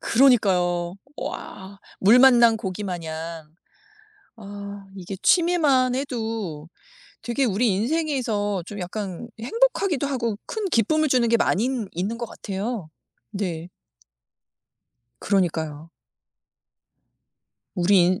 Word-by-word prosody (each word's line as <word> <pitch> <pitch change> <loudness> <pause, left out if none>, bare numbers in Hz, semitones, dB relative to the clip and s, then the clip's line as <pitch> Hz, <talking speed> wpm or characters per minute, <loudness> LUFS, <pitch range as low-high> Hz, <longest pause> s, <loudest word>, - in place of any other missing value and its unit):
그러니까요. 185 -9 +3 0.2
와. 195 +1 -7 0.2
물 215 +6 +6
만난 240 -3 +7
고기마냥. 170 -6 -5 0.8
아 200 -1 -9
이게 190 +1 -6
취미만 300 -8 +3
해도 225 - -4 0.5
되게 240 +4 0
우리 230 +2 +2
인생에서 220 - 0
좀 205 +2 -8
약간 195 +3 -5
행복하기도 370 - +1
하고 235 -6 -2
큰 435 -2 -3
기쁨을 310 +7 +2
주는 250 -3 +3
게 235 - +4
많이 225 +1 +1 0.2
있는 195 +7 -3
것 235 - -3
같아요. 200 -3 -5 0.4
네. 175 -4 -4 1.5
그러니까요. 160 -5 -1 1.9
우리 180 0 +4
인 185 +1 +1
205 Hz, 210 characters per minute, -24 LUFS, 180-250 Hz, 1.9 s, 만난